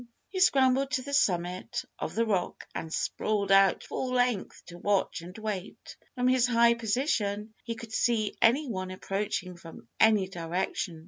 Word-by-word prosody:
He 375 - -4
scrambled 270 -6 +4
to 260 -3 0
the 280 +2 -7
summit 180 -7 0
of - - -4
the 230 +1 +2
rock 195 -5 -2
and 160 - -5
sprawled 200 +3 -1
out 195 -1 +5
full 255 - -4
length 245 -5 0
to 175 0 -11
watch 200 -2 0
and 180 +4 -10
wait. 210 -3 -6 0.2
From 250 0 +1
his 255 -1 +4
high 235 -1 +5
position, 220 -3 -1
he 230 -1 -4
could 225 0 -10
see 220 -3 +1
any 270 +6 +4
one 185 -5 -4
approaching 185 -1 -3
from 165 -8 -12
any 215 -3 +5
direction. 175 -1 -3
215 Hz, 165 wpm, -29 LUFS, 185-245 Hz, 0.2 s, out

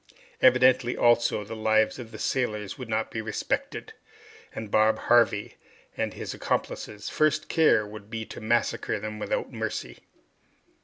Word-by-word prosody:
Evidently, 130 -1 +5
also, 120 -2 +3
the 110 +3 -7
lives 110 +1 +2
of 120 -3 -8
the - - -10
settlers 105 -6 -2
would 125 -3 -8
not 110 0 -1
be 110 - -3
respected, 110 -1 -3 0.6
and 110 -2 -7
Bob 110 0 +4
Harvey 115 -4 +2 0.4
and - - -2
his - - -5
accomplices' 105 -1 -3
first 155 0 +1
care 155 -9 +4
would 105 0 -11
be 110 -1 -4
to - - -9
massacre 115 -1 0
them 110 +1 -6
without - - -2
mercy. - - -4
110 Hz, 145 wpm, -27 LUFS, 110-120 Hz, 0.6 s, Evidently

